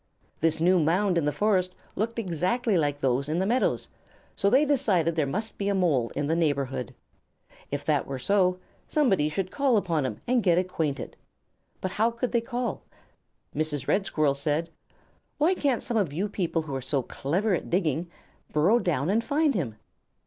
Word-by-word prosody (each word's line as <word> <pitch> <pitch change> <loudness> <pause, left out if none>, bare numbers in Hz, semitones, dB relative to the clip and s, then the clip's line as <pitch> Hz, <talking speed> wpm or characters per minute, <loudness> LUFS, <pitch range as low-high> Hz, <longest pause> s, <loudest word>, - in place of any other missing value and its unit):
This 160 0 +2
new 180 +2 +4
mound 180 +4 +2
in 170 -3 +1
the 150 - +2
forest 185 +2 +1 0.2
looked 230 +3 -2
exactly 200 - 0
like 145 -4 +1
those 135 +2 +1
in 155 - 0
the 190 - +1
meadow, 240 +5 +2 0.6
so 200 - +2
they 265 +7 +5
decided 190 - +2
there 155 -3 +1
must 210 +10 -3
be 200 0 0
a 200 - +1
Mole 145 -11 +2
in 145 - -1
the 160 +3 +1
neighborhood. 140 -7 -1 0.7
If - - -4
that - - +1
were 135 - -4
so, 185 +6 +2 0.3
somebody 200 - +2
should 185 +4 -3
call 275 -5 +2
upon 165 -9 0
him - - -6
and 245 0 +2
get 175 -5 +3
acquainted; 160 -7 -2 0.6
but 185 - -2
how 220 +4 +2
could 235 +1 -3
they 235 - +2
call? 240 -2 -3 0.7
Mrs. 150 -3 -1
Red 195 -1 +1
Squirrel 150 -3 +2
said: 150 +4 -1 0.7
"Why 315 +5 +3
can't 280 -9 0
some 240 -2 -1
of 190 -9 +1
you 180 +8 -1
people 175 -5 -1
who 150 -3 -7
are 135 - -2
so 130 +1 -1
clever 185 - -1
at 175 - -2
digging, 170 -2 0 0.4
burrow 180 +11 +4
down 155 - 0
and 225 +3 +2
find 295 +2 +2
him?" 135 - -2
180 Hz, 185 wpm, -27 LUFS, 150-215 Hz, 0.7 s, they